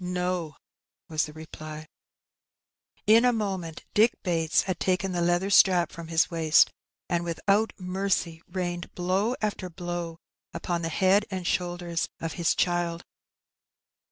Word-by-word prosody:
No," 180 -3 -2 0.5
was 155 -1 +1
the 150 - -11
reply. 155 0 -9 1.2
In 225 +2 +6
a 250 - +5
moment 190 -8 -3
Dick 225 +3 +4
Bates 165 -3 +2
had 185 -3 -3
taken 190 0 0
the 175 -1 -1
leather 175 +3 +1
strap 180 -3 +5
from 170 -1 -8
his 165 +1 +2
waist, 160 -2 +4 0.4
and 175 0 0
without 195 +6 +1
mercy 180 -3 -1
rained 175 -1 -4
blow 190 +7 0
after 200 -3 -2
blow 175 -1 -5 0.4
upon 175 -1 -2
the 165 - -2
head 190 +5 +3
and 185 -2 -4
shoulders 175 -1 -1
of 165 - -4
his 170 -1 +1
child. 175 -1 0
175 Hz, 135 wpm, -27 LUFS, 165-190 Hz, 1.2 s, In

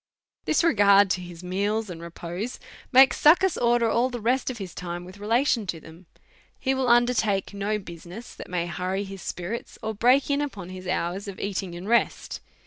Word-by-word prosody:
This - - +2
regard 200 - +5
to 185 - 0
his 175 -1 -10
meals 205 +4 -1
and 170 -3 -8
repose 175 +6 -6 0.3
makes 265 0 +6
Succus 355 +4 +6
order 240 -1 +2
all 235 +3 +2
the 245 -1 -5
rest 245 +5 +1
of 255 - -5
his 190 -5 -7
time 175 0 -6
with 185 +2 -12
relation 230 +1 +1
to 170 -2 -3
them. 165 +3 -15 0.5
He 265 - 0
will 265 -1 0
undertake 235 -5 +2
no 200 +1 -1
business 180 +3 -10
that - - -10
may 175 -1 -1
hurry 185 +3 -2
his 195 -1 -9
spi 180 - -5
rits, 225 +7 -5
or 220 0 -2
break 250 +7 +3
in 285 +1 +1
upon 200 -11 -5
his 185 0 -8
hours 185 +2 -2
of 195 -2 -7
eating 190 -3 -3
and 175 +3 -8
rest. 235 +1 0
200 Hz, 195 wpm, -25 LUFS, 180-240 Hz, 0.5 s, makes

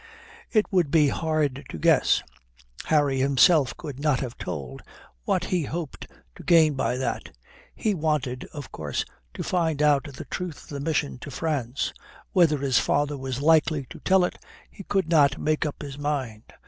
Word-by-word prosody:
It 215 -2 +3
would 175 -6 +3
be 150 -1 +4
hard 150 -3 -1
to - - -6
guess 75 - +3 0.6
Harry 145 -4 +2
himself 140 +1 +4
could 140 -3 -7
not 145 -3 +2
have 125 -3 -5
told 70 -7 -6 0.4
what 180 - +1
he 180 -4 -1
hoped 160 0 -6 0.3
to - - -12
gain 160 -3 +5
by 125 -2 -1
that. 130 - -4 0.4
He 215 - 0
wanted, 150 -7 -1
of 145 -2 -9
course, 75 -3 -3 0.3
to - - -4
find 165 -5 0
out 150 -2 +3
the 140 -3 -8
truth 180 -4 -5
of - - -18
the 145 - -5
mission 140 - -1
to - - -8
France. 140 -5 -2 0.4
Whether 165 -5 +4
his 135 -2 +2
father 145 +1 +1
was 135 -1 -4
likely 155 -2 +3
to - - -9
tell 190 -1 +3
it, - - -6 0.3
he - - -11
could 195 -4 0
not 150 -4 +4
make 155 0 0
up 150 - -6
his 140 -1 -8
mind. 135 -7 -3
145 Hz, 175 wpm, -25 LUFS, 135-160 Hz, 0.6 s, gain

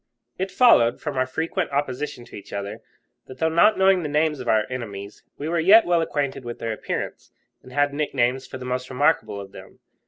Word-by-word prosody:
It 190 +1 -1
followed, 185 - +4
from 150 -3 -5
our 130 0 +1
frequent 160 +5 -2
opposition 140 -2 -3
to - - -13
each 100 - -11
other, 100 +2 -5 0.5
that, 130 - -11
though 160 +4 +1
not 170 +7 +4
knowing 190 -1 +4
the 150 - -4
names 150 0 +1
of 125 - -7
our 110 -2 +3
enemies, 105 -5 -7 0.2
we 145 - -5
were 170 +1 0
yet 205 +7 +7
well 175 -1 +2
acquainted 140 -4 -2
with 120 -1 -6
their 115 -1 -3
appearance, - - -5 0.3
and 130 - -15
had 145 +1 +1
nicknames 130 -3 0
for 130 - -7
the 130 - -8
most 125 0 -3
remarkable 145 -4 +1
of 100 -1 -9
them. - - -13
135 Hz, 210 wpm, -23 LUFS, 120-160 Hz, 0.5 s, yet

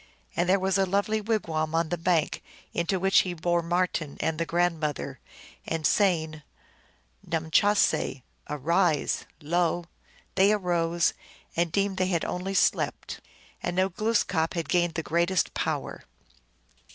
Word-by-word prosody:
And 175 +1 +1
there 195 - +5
was 190 +1 +1
a 195 - +4
lonely 205 +3 +1
wigwani 165 -8 -1
on 165 -1 +1
the 175 - 0
bank, 165 -2 +1 0.3
into 175 +3 0
which 195 +1 +4
he 180 -1 -1
bore 175 +1 +1
Marten 170 -3 -1
and 160 0 -1
the 165 - -1
grandmother, 155 -6 -1 0.5
and 165 -1 -2
saying, 160 -6 +2 0.4
" - - -27
Numchahse! 160 -3 +2 0.3
arise! 155 +2 +1
" - - -40
lo, 175 +2 +1 0.5
they 195 +2 +4
arose, 175 -4 +1 0.4
and 170 0 +1
deemed 195 +1 0
they 185 - +1
had 175 -3 0
only 190 +2 -3
slept. - - 0 0.4
And 175 - -2
now 185 +1 +2
Glooskap 190 -5 0
had 165 -4 -3
gained 175 -1 +2
the 160 - -2
greatest 170 +3 +1
power. - - -3
175 Hz, 140 wpm, -27 LUFS, 160-190 Hz, 0.5 s, there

